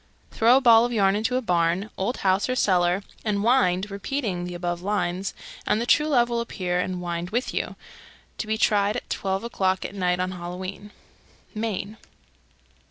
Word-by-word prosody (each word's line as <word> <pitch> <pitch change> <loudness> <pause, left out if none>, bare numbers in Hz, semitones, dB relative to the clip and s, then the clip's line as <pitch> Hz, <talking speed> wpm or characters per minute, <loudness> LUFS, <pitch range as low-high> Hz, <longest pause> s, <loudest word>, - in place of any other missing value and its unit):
Throw 235 +3 +5
a - - +2
ball 230 -3 +7
of 245 - -1
yarn 195 -4 +3
into 225 +4 0
a 255 - 0
barn, 175 +2 +1
old 205 +7 -2
house, 190 +5 +2
or 255 - 0
cellar, 180 -4 +2 0.2
and 205 -2 0
wind, 210 -5 +2
repeating 200 -3 -3
the 175 0 -6
above 175 0 -3
lines, 190 -1 -2 0.3
and 210 - +2
the 235 - -1
true 300 +4 +3
love 245 -5 +3
will 235 -1 -1
appear 180 -6 -2
and 180 0 -2
wind 170 0 -3
with 240 +5 -2
you. - - -3 0.6
To 220 - -3
be 220 0 0
tried 205 -1 +2
at - - -8
twelve 195 +1 -2
o'clock 190 -5 0
at - - -6
night, 180 -2 0
on 185 0 -1
Halloween. 185 +3 -7 0.7
_Maine. 215 -1 -3
200 Hz, 180 wpm, -25 LUFS, 180-225 Hz, 0.7 s, ball